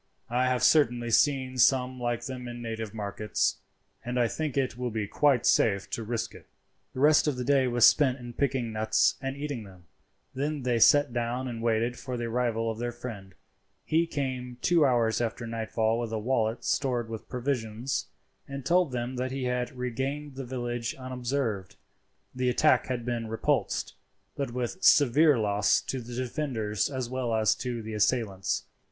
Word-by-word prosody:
I 125 Hz, +1 st, +2 dB
have 125 Hz, -1 st, 0 dB
certainly 120 Hz, -6 st, +3 dB
seen 130 Hz, 0 st, +2 dB
some 130 Hz, 0 st, +3 dB
like 120 Hz, -1 st, -2 dB
them 125 Hz, -1 st, -6 dB
in 120 Hz, 0 st, -7 dB
native 110 Hz, -2 st, -5 dB
markets, 105 Hz, 0 st, -1 dB, 0.5 s
and 125 Hz, +1 st, -2 dB
I 120 Hz, -, +3 dB
think 150 Hz, +2 st, -3 dB
it 130 Hz, -3 st, 0 dB
will 125 Hz, 0 st, -3 dB
be 110 Hz, -2 st, -2 dB
quite 135 Hz, +3 st, +2 dB
safe 100 Hz, -3 st, +3 dB
to -, -, -2 dB
risk 115 Hz, +1 st, -3 dB
it." -, -, -14 dB, 0.5 s
The -, -, -4 dB
rest 150 Hz, +2 st, +5 dB
of 145 Hz, -, +1 dB
the 125 Hz, -, -3 dB
day 135 Hz, 0 st, +3 dB
was 120 Hz, -1 st, +5 dB
spent 135 Hz, -4 st, +5 dB
in 120 Hz, -2 st, -9 dB
picking 130 Hz, -3 st, -1 dB
nuts 110 Hz, 0 st, +2 dB
and 135 Hz, 0 st, -4 dB
eating 140 Hz, -5 st, -4 dB
them. 95 Hz, -3 st, -15 dB, 0.5 s
Then 145 Hz, +1 st, -2 dB
they 120 Hz, -2 st, +1 dB
sat 145 Hz, +2 st, +5 dB
down 120 Hz, +2 st, -2 dB
and 115 Hz, -2 st, -5 dB
waited 115 Hz, +1 st, 0 dB
for 125 Hz, -2 st, -5 dB
the 120 Hz, -, -3 dB
arrival 115 Hz, -1 st, 0 dB
of 110 Hz, -, -7 dB
their 120 Hz, 0 st, -2 dB
friend. 110 Hz, -6 st, -8 dB, 0.5 s
He 165 Hz, +2 st, +2 dB
came 130 Hz, -5 st, -4 dB
two 165 Hz, -4 st, +4 dB
hours 115 Hz, -3 st, +2 dB
after 120 Hz, 0 st, -3 dB
nightfall 115 Hz, 0 st, -1 dB
with 120 Hz, -2 st, -3 dB
a 110 Hz, -, -1 dB
wallet 115 Hz, 0 st, -1 dB
stored 125 Hz, -4 st, 0 dB
with 115 Hz, -1 st, -8 dB
provisions, 125 Hz, -1 st, -2 dB, 0.4 s
and 140 Hz, -1 st, -7 dB
told 175 Hz, -3 st, +3 dB
them 125 Hz, +1 st, -3 dB
that 130 Hz, +1 st, -2 dB
he 135 Hz, 0 st, -3 dB
had 125 Hz, 0 st, -1 dB
regained 135 Hz, +4 st, -3 dB
the 135 Hz, 0 st, -6 dB
village 120 Hz, -2 st, -3 dB
unobserved. 125 Hz, -6 st, -3 dB, 0.6 s
The 125 Hz, 0 st, 0 dB
attack 155 Hz, +5 st, +3 dB
had 125 Hz, -3 st, -3 dB
been 120 Hz, -2 st, -2 dB
repulsed, 110 Hz, 0 st, -1 dB, 0.4 s
but 140 Hz, -2 st, -2 dB
with 125 Hz, +9 st, -4 dB
severe 145 Hz, +1 st, +6 dB
loss 105 Hz, -2 st, +2 dB
to 130 Hz, -, -4 dB
the 120 Hz, +1 st, -8 dB
defenders 120 Hz, -5 st, -2 dB
as 130 Hz, -3 st, -3 dB
well 125 Hz, -2 st, -2 dB
as 110 Hz, -1 st, +3 dB
to 120 Hz, -3 st, -4 dB
the 110 Hz, 0 st, -6 dB
assailants. 105 Hz, -3 st, 0 dB
125 Hz, 180 wpm, -28 LUFS, 115-130 Hz, 0.6 s, severe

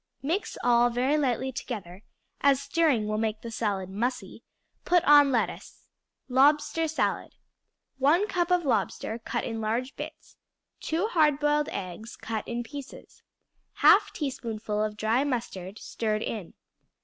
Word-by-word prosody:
Mix 335 Hz, +9 st, -2 dB
all 240 Hz, 0 st, +4 dB
very 250 Hz, +5 st, +1 dB
lightly 265 Hz, -3 st, 0 dB
together, 200 Hz, -8 st, -6 dB, 0.4 s
as 280 Hz, -2 st, +4 dB
stirring 280 Hz, -6 st, +1 dB
will 215 Hz, 0 st, -1 dB
make 220 Hz, -1 st, -2 dB
the 230 Hz, -, -7 dB
salad 205 Hz, -4 st, -2 dB
mussy; 230 Hz, +7 st, -3 dB, 0.4 s
put 355 Hz, -1 st, +3 dB
on 290 Hz, -1 st, +7 dB
lettuce. 240 Hz, -3 st, -3 dB, 0.4 s
Lobster 295 Hz, +5 st, +3 dB
Salad 320 Hz, -, -2 dB, 0.6 s
1 325 Hz, +10 st, +3 dB
cup 355 Hz, -3 st, 0 dB
of 360 Hz, -2 st, +2 dB
lobster, 225 Hz, -1 st, -1 dB
cut 225 Hz, -, -3 dB
in 225 Hz, 0 st, -4 dB
large 235 Hz, +5 st, -2 dB
bits. -, -, -9 dB, 0.4 s
2 340 Hz, +7 st, -1 dB
hard 300 Hz, -7 st, +3 dB
boiled 295 Hz, 0 st, +1 dB
eggs, 190 Hz, +5 st, -6 dB
cut 220 Hz, -1 st, -5 dB
in 240 Hz, 0 st, -3 dB
pieces. 280 Hz, +3 st, -10 dB, 0.6 s
1/2 -, -, +6 dB
teaspoonful 225 Hz, -7 st, -3 dB
of 210 Hz, -1 st, -3 dB
dry 225 Hz, +5 st, +1 dB
mustard, 220 Hz, -8 st, -4 dB
stirred 215 Hz, -1 st, -2 dB
in. 205 Hz, -7 st, -5 dB
245 Hz, 135 wpm, -27 LUFS, 220-295 Hz, 0.6 s, on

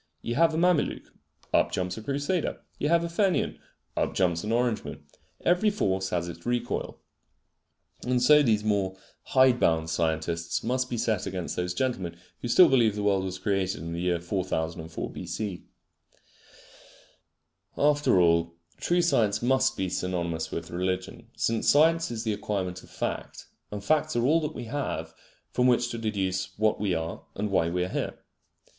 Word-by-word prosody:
You 120 Hz, -, -2 dB
have 165 Hz, +3 st, +3 dB
a -, -, -1 dB
Mameluke: 175 Hz, -2 st, +1 dB, 0.4 s
up -, -, +3 dB
jumps 90 Hz, 0 st, -2 dB
a -, -, -7 dB
Crusader. 145 Hz, +8 st, -2 dB, 0.2 s
You 145 Hz, -, 0 dB
have 170 Hz, 0 st, +4 dB
a -, -, -1 dB
Fenian: 185 Hz, +2 st, 0 dB, 0.4 s
up -, -, -1 dB
jumps 85 Hz, -3 st, +1 dB
an 105 Hz, -, -2 dB
Orangeman. 115 Hz, -, -1 dB, 0.4 s
Every 180 Hz, +5 st, +4 dB
force 95 Hz, -, 0 dB
has 85 Hz, -2 st, -1 dB
its 85 Hz, 0 st, -8 dB
recoil. 120 Hz, 0 st, -2 dB, 1.1 s
And 125 Hz, 0 st, +2 dB
so 150 Hz, +4 st, +6 dB
these 110 Hz, -6 st, +2 dB
more 100 Hz, -3 st, 0 dB, 0.3 s
hide 130 Hz, -2 st, +4 dB
bound 80 Hz, 0 st, +2 dB
scientists 85 Hz, +1 st, -1 dB
must 125 Hz, +2 st, 0 dB
be 120 Hz, -, -2 dB
set 110 Hz, -3 st, 0 dB
against 90 Hz, -2 st, -4 dB
those 90 Hz, 0 st, -2 dB
gentlemen 95 Hz, -8 st, -2 dB, 0.2 s
who -, -, -3 dB
still 175 Hz, +9 st, +7 dB
believe 120 Hz, -6 st, +4 dB
that 105 Hz, -, -3 dB
the -, -, -3 dB
world 100 Hz, -2 st, +2 dB
was 95 Hz, 0 st, -4 dB
created 95 Hz, -4 st, -1 dB
in 85 Hz, 0 st, -5 dB
the 85 Hz, -, -3 dB
year 90 Hz, -1 st, +1 dB
4004 85 Hz, -2 st, -3 dB
B. -, -, -8 dB
C. 100 Hz, -5 st, -4 dB, 2.1 s
After 145 Hz, -8 st, +3 dB
all, 85 Hz, -1 st, +3 dB, 0.2 s
true 175 Hz, 0 st, +1 dB
science 115 Hz, -10 st, +2 dB
must 130 Hz, +1 st, +2 dB
be 95 Hz, -, 0 dB
synonymous 85 Hz, -3 st, -2 dB
with 85 Hz, +1 st, -5 dB
religion, 95 Hz, +5 st, -3 dB
since 115 Hz, 0 st, +1 dB
science 165 Hz, +3 st, +4 dB
is 115 Hz, -1 st, -4 dB
the 110 Hz, -2 st, 0 dB
acquirement 95 Hz, -3 st, -3 dB
of -, -, -17 dB
fact; -, -, -4 dB, 0.2 s
and 105 Hz, -1 st, -6 dB
facts 155 Hz, +3 st, +1 dB
are 120 Hz, 0 st, +2 dB
all 160 Hz, +5 st, +4 dB
that 150 Hz, -, -4 dB
we -, -, -5 dB
have 140 Hz, +5 st, -4 dB, 0.4 s
from 125 Hz, 0 st, +2 dB
which 120 Hz, -1 st, +2 dB
to 115 Hz, -, -4 dB
deduce 95 Hz, -4 st, -2 dB
what 110 Hz, 0 st, +2 dB
we 100 Hz, -4 st, 0 dB
are 80 Hz, 0 st, -4 dB
and 105 Hz, +1 st, -2 dB
why 85 Hz, -3 st, +2 dB
we 90 Hz, +1 st, 0 dB
are 90 Hz, -, -3 dB
here. -, -, -3 dB
105 Hz, 175 wpm, -27 LUFS, 90-130 Hz, 2.1 s, still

